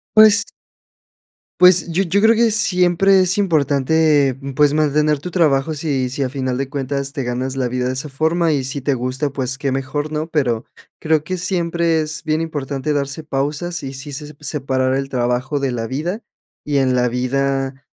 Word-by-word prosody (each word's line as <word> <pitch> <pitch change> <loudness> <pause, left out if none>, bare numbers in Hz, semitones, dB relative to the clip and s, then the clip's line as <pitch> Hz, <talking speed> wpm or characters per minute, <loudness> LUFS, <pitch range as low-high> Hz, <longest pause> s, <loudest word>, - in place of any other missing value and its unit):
Pues 215 0 +7 1.2
Pues, 180 -2 +6
yo 180 +4 +1
yo 195 +3 +1
creo 225 +1 +5
que 230 0 +3
siempre 190 -2 +3
es 185 +1 +2
importante, 150 -4 +2 0.2
pues, 145 0 +4
mantener 150 0 +2
tu 180 - -6
trabajo, 155 -4 +2
si 140 -4 -1
si, 135 +2 -2
a 130 - -1
final 130 -1 -2
de 135 0 -3
cuentas 140 0 -3
te 135 - -4
ganas 130 +2 -3
la 130 - 0
vida 125 +1 -2
de - - 0
esa 130 +4 -4
forma 160 +4 +1
y 140 -2 0
si 130 +2 -4
te 140 +1 0
gusta, 130 +3 -2
pues 130 -1 -3
qué 135 -2 -2
mejor, 135 +3 -3
¿no?, 155 +1 -3
pero 125 -8 0 0.4
creo 155 -1 +1
que 185 - -2
siempre 170 -2 0
es 155 0 -4
bien 155 -1 0
importante 150 -2 -3
darse 140 +2 -3
pausas 150 +5 -3
y 135 - -5
sí 135 +2 -8
se 150 +1 -7
separar 135 -3 -1
el 135 0 -2
trabajo 125 +3 -1
de 135 -2 -1
la 115 -1 -3
vida 170 - -3 0.4
y 145 -1 -1
en 130 -2 +2
la 125 -1 +2
vida, 135 +2 -2
145 Hz, 185 wpm, -19 LUFS, 135-160 Hz, 1.2 s, Pues